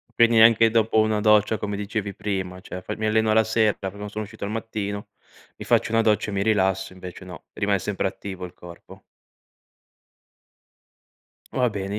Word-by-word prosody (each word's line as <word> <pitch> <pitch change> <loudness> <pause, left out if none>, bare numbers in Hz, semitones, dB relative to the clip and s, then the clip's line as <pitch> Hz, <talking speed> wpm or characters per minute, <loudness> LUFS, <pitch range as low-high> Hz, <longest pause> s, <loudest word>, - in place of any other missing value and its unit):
Quindi 115 0 +4
neanche 115 0 +7
dopo 110 -1 +2
una 110 -1 +2
doccia, 105 0 +4
come 100 +1 -4
dicevi 100 0 -3
prima, 95 -3 -4
cioè, 90 - -8
fai: - - -6
"Mi 110 - -2
alleno 110 0 +2
alla 110 +1 +5
sera 110 -1 +2
perché 95 0 -6
non 105 0 -6
sono 110 +1 -4
uscito 100 - -11
al 105 - -4
mattino, 105 -2 -4 0.5
mi - - -8
faccio - - +2
una 115 - +4
doccia 110 -1 +1
e - - -5
mi 100 0 0
rilasso." 95 -3 +1
Invece 90 0 -10
no, 90 -1 -11
rimane 100 -2 0
sempre 95 +1 -2
attivo 95 -1 -7
il 90 - -11
corpo. 85 -1 -13 2.5
Va 125 -2 +1
bene, 100 0 -4
105 Hz, 180 wpm, -24 LUFS, 95-110 Hz, 2.5 s, neanche